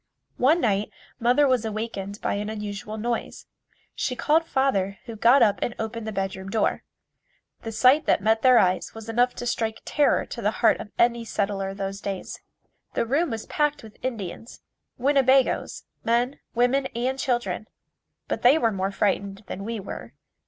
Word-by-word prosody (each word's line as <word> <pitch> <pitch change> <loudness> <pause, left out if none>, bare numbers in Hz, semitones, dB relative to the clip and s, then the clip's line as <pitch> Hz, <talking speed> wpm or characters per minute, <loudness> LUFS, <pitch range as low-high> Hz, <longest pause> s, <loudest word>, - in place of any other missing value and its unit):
One 300 +7 +4
night 205 -2 +1 0.3
mother 250 +5 +4
was 255 -3 +2
awakened 215 -2 -4
by - - 0
an 205 +1 -3
unusual 210 0 -5
noise. 235 +2 -3 0.5
She 250 - -2
called 315 +5 +2
father, 200 -10 +1
who 230 - -7
got 240 +4 +5
up 210 -3 +3
and 240 - -2
opened 220 0 -4
the - - -2
bedroom 195 -1 -3
door. 220 +2 0 0.8
The 225 - -5
sight 255 +7 +4
that - - +4
met 220 +2 +2
their 255 -1 +6
eyes 185 -2 +2
was 225 0 -9
enough 245 +2 +2
to 245 - -5
strike 225 -2 -2
terror 295 -1 +2
to 235 - -7
the 210 - +2 0.2
heart - - +5
of - - -7
any 235 0 +3
settler 200 -3 -2
of 195 - -8
those 195 0 -4
days. 195 -2 -5 0.6
The - - +1
room 290 +8 +1
was 225 -2 -4
packed 295 -3 0
with 220 +1 -15
Indians 225 -3 -5 0.4
Winnebagoes 270 0 +2 0.2
men, 240 +4 +1 0.2
women 255 +3 +2
and 255 +3 -1
children, 240 -6 -1 0.6
but - - -2
they 255 +5 +6
were 230 -7 +2
more 195 -1 -1
frightened 200 0 -1
than 195 - -6
we 225 +1 -4
were. 195 - -8
225 Hz, 175 wpm, -25 LUFS, 205-250 Hz, 0.8 s, their